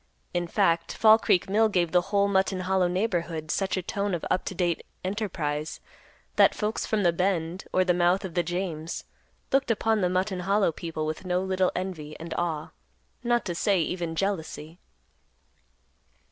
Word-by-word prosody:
In 175 -1 -1
fact, 165 0 +1
Fall 220 0 +6
Creek 180 - +2
Mill 215 +3 +3
gave 175 -5 +1
the 180 - +4
whole 200 0 +3
Mutton 190 -1 +1
Hollow 185 0 +2
neighborhood 175 -5 -1
such 195 -1 0
a 185 - -2
tone 200 +1 -1
of 170 - -5
up - - +1
to - - -4
date 175 -3 0 0.2
enterprise, 170 -7 -3 0.6
that - - +6
folks 215 +1 -2
from 215 -2 +1
the 175 -2 +4
Bend, 180 -1 -1
or 185 - +3
the 180 - +3
mouth 180 +3 +2
of 180 - -6
the 175 - +2
James, 170 -2 -3 0.5
looked 270 -1 +2
upon 220 -1 +2
the 180 - +2
Mutton 185 +1 0
Hollow 195 0 +2
people 160 -1 -4
with 155 +3 -4
no 180 -1 0
little 190 -1 +1
envy 165 -5 -5
and 165 0 -6
awe, 160 -3 -2 0.5
not 240 0 +1
to 175 - -2
say 195 +2 +2
even 170 0 -2
jealousy. 165 -3 -3
180 Hz, 175 wpm, -27 LUFS, 170-195 Hz, 0.6 s, Fall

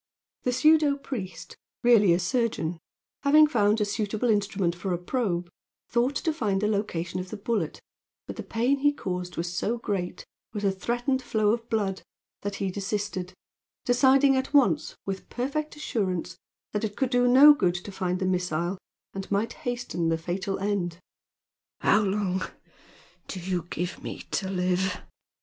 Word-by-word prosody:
The 250 - +2
pseudo 300 +1 +4
priest, 185 -11 -7 0.3
really 225 -6 +6
a 170 - +5
surgeon, 180 -4 -1 0.4
having 300 +2 +7
found 215 -7 +2
a 210 - +2
suitable 215 +3 0
instrument 200 -4 +1
for 180 +1 -2
a - - 0
probe, 180 -2 -1 0.4
thought 245 +4 +1
to 320 - 0
find 205 -9 0
the 210 - +1
location 185 -5 -2
of 185 0 -6
the 215 - -6
bullet, 200 -6 -2 0.5
but - - -7
the - - -5
pain 245 +5 0
he 290 +1 +3
caused 180 -7 -4
was 175 +1 -2
so 230 +6 0
great, 195 -6 -3 0.3
with 210 -2 -4
a 200 - +3
threatened 240 +7 -1
flow 215 -4 +1
of 230 +1 -2
blood, 200 -4 -1 0.4
that 205 0 -3
he 195 -2 -2
desisted, 195 -2 -3 0.5
deciding 265 +2 +5
at 265 +2 -1
once, 170 - +3
with 195 -1 -5
perfect 290 +5 -3
assurance, 185 - -2 0.4
that 210 - -2
it 210 -2 -2
could 265 -2 0
do 245 -1 +4
no 275 +4 +9
good 180 -10 +1
to 180 +3 -6
find 180 -1 -1
the 185 - -2
missile 180 0 -1 0.3
and 195 0 -6
might 210 +3 0
hasten 240 -9 -2
the 165 - +1
fatal 190 +4 -3
end. 190 -4 -1 0.8
"How 210 - +4
long 195 -2 0 0.9
do 190 - -5
you 175 -1 -2
give 175 +2 -4
me - - -6
to 190 - -1
live?" 185 0 0
205 Hz, 165 wpm, -27 LUFS, 180-245 Hz, 0.9 s, no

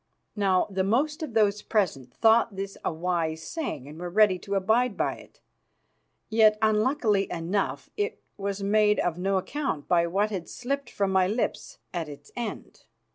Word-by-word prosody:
Now, 195 -3 +2
the 190 0 0
most 275 +11 +1
of 295 -8 -5
those 210 -1 +3
present 155 - -1
thought 225 - +3
this 195 0 -5
a - - 0
wise 160 -1 -2
saying 265 - -4
and 150 +3 -10
were 175 0 -4
ready 195 -1 +4
to 200 +2 -4
abide 220 +4 +2
by - - 0
it. - - -17 0.9
Yet, 215 -1 +5
unluckily 215 -1 +2
enough, 175 +4 -2
it 420 +2 -2 0.2
was 200 0 -3
made 210 +1 +3
of 175 -1 -1
no 195 +1 +1
account 225 - -3
by 170 -1 +3
what 200 +5 0
had 185 -5 -4
slipped 275 +3 -3
from 200 -1 -1
my 190 -1 +3
lips 220 +5 -2 0.2
at 165 -4 -3
its 145 0 -12
end. 235 -2 -6
200 Hz, 170 wpm, -27 LUFS, 180-220 Hz, 0.9 s, Yet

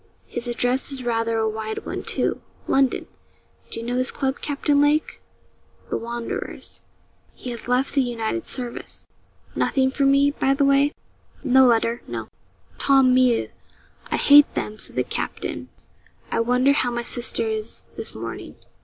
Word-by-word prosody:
'His 240 0 -5
address 245 +3 0
is 265 -2 -4
rather 230 -1 0
a 220 0 +1
wide 220 0 -4
one, - - -4
too - - -2 0.3
London! 270 -1 +2 0.6
Do - - -5
you 230 - -6
know 245 +1 -1
his 255 +1 +1
club, 270 -1 -2
Captain 285 0 +1
Lake?' 295 +2 +1 0.7
'The - - +1
Wanderers. 235 0 -6 0.5
He 250 - -6
has 235 0 -7
left 250 +2 +1
the 280 - +3
United 240 +6 -2
Service. 245 -2 -4 0.5
Nothing 265 -2 +2
for 275 0 +1
me, 280 +1 +4
by 275 -1 +1
the 280 0 +2
way?' 275 +1 +4 0.5
'No 260 0 +6
letter. 235 0 +2
No.' - - -5 0.5
'Tant 270 -2 +5
mieux, 255 -2 +3 0.6
I - - -1
hate 290 0 +7
them,' 215 0 -3
said - - -8
the - - +1
captain. - - -4 0.6
'I - - 0
wonder 250 +4 +3
how 260 -3 +2
my 240 0 -3
sister 240 - +1
is 435 -1 -2
this - - 0
morning.' - - -7
255 Hz, 155 wpm, -23 LUFS, 235-275 Hz, 0.7 s, hate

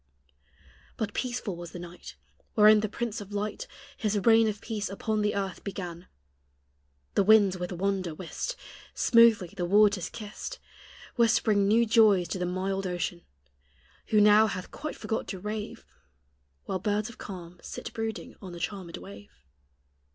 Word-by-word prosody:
But 205 -2 -3
peaceful 240 -6 -3
was 175 -1 -9
the - - -6
night 175 0 -10 0.4
Wherein 215 0 +7
the 215 0 -1
prince 225 0 -4
of 205 0 -10
light 210 - -3 0.3
His 210 -2 0
reign 225 +2 +5
of 210 -1 -2
peace 210 -3 -4
upon 215 +2 -1
the 210 0 0
earth 195 -2 -3
began; 180 -3 -6 1.1
The - - +3
winds, 200 -2 +5
with 180 +1 -4
wonder 185 -2 -1
whist, 190 - -5 0.4
Smoothly 230 -7 +5
the 180 - -3
waters 200 -1 +4
kissed, 225 - -7 0.6
Whispering 220 -3 +3
new 230 +3 +4
joys 215 -5 +5
to 185 - -3
the 180 - -1
mild 190 +1 -2
ocean, 175 -1 -3 0.9
Who 215 - +3
now 210 +1 +7
hath 185 -3 -5
quite 305 +1 -6
forgot 220 - -3
to 190 - -5
rave, 210 +2 -5 0.8
While 190 - -2
birds 210 +2 0
of 235 - -13
calm 180 -3 -9
sit - - -7
brooding 225 -1 -4
on 185 -3 -8
the 175 - -8
charmed 180 -1 -5
wave. 100 -9 -13
205 Hz, 150 wpm, -28 LUFS, 180-220 Hz, 1.1 s, Wherein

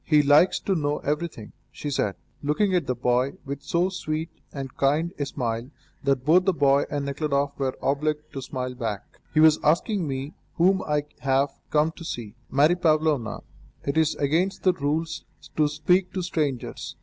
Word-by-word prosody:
"He 150 -2 +4
likes 145 +6 +5
to 195 - 0
know 150 -4 0
everything," 150 -7 -3 0.2
she 145 - -5
said, 100 -8 0 0.3
looking 170 +7 +1
at 180 -2 +1
the 125 - 0
boy 125 +2 +1
with 140 0 -5
so 170 +6 +1
sweet 160 -3 -3 0.2
and 135 -2 -6
kind 150 +5 +1
a 145 - -1
smile 120 -2 -3 0.3
that 135 -2 +1
both 180 +4 +5
the 190 - +3
boy 140 -3 +3
and 145 -1 -2
Nekhludoff 140 0 0
were 135 -1 -1
obliged 150 +2 -1
to 135 - -4
smile 130 -1 -4
back. 110 -5 -5
"He 155 - +2
was 155 0 +6
asking 175 +3 +2
me 135 +2 -4 0.2
whom 185 +3 +3
I 150 -1 +1
have 135 +1 +2 0.2
come 155 +1 +2
to 170 - -11
see." 115 -9 -5 0.2
"Mary 150 +5 +4
Pavlovna, 155 -8 +1 0.4
it 140 - -2
is 160 -1 +2
against 170 +7 0
the 185 - +4
rules 160 +1 -2 0.3
to 155 -1 +3
speak 180 +5 +1
to 185 - -2
strangers. 150 -7 -3
150 Hz, 175 wpm, -25 LUFS, 135-165 Hz, 0.4 s, was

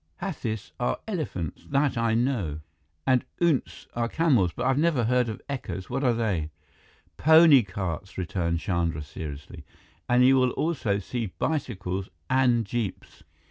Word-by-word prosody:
"Hathis 135 - -4
are 120 - 0
elephants, 150 - -4
that 140 0 +2
I 115 -1 +1
know. 115 - 0 0.4
And 130 -2 +3 0.2
oonts 170 -6 0
are 115 0 -1
camels. 125 - +3
But 125 - -5
I 135 - +4
never 150 -2 +2
heard 125 +1 +2
of 110 - -7
ekkas. 120 -8 -5
What 135 +3 -1
are 125 -3 +3
they?" 100 -9 -1 0.7
"Pony 160 -3 +7
carts," 95 -1 -5
returned 85 -2 -1
Chandra 85 -6 -1
seriously, 75 0 -8 0.5
"and 125 +1 +5
you 135 +1 +6
will 130 -1 +3
also 130 -11 0
see 115 +3 -3
bicycles 100 - -2 0.2
and 125 -3 +3
jeeps." 110 -2 -4
120 Hz, 140 wpm, -26 LUFS, 95-135 Hz, 0.7 s, Pony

